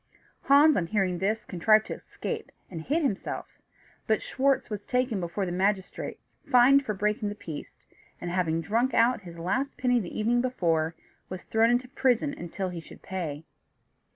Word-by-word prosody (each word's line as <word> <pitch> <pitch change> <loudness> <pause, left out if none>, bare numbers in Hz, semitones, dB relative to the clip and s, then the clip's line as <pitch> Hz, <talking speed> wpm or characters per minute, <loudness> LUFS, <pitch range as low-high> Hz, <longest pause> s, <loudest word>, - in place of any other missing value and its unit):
Hans, 290 +3 +6
on 170 -3 0
hearing 185 -3 0
this, 215 +3 -1
contrived 215 +5 +3
to - - -4
escape, - - -6 0.2
and 165 -3 -5
hid 305 - 0
himself; 215 -9 -3 0.5
but 220 -1 +1
Schwartz 275 0 +1
was 210 -2 -5
taken 250 -4 0
before 175 +3 -2
the 175 - -3
magistrate, 190 +1 -1 0.3
fined 260 +3 +6
for 215 -5 -3
breaking 210 +1 0
the 205 - -5
peace, 160 -7 -9 0.3
and, 175 - -4
having 165 -3 0
drunk 230 +8 0
out 235 0 +3
his 170 -3 -11
last 200 +12 -2
penny 250 -1 +2
the 190 -2 -5
evening 240 +3 +2
before, 170 -10 0 0.3
was 185 -1 -6
thrown 225 +1 +3
into 245 +1 +1
prison 260 - 0
till 190 +2 -3
he 175 -1 -6
should 165 - -14
pay. 165 -5 -5
210 Hz, 170 wpm, -27 LUFS, 180-250 Hz, 0.5 s, Hans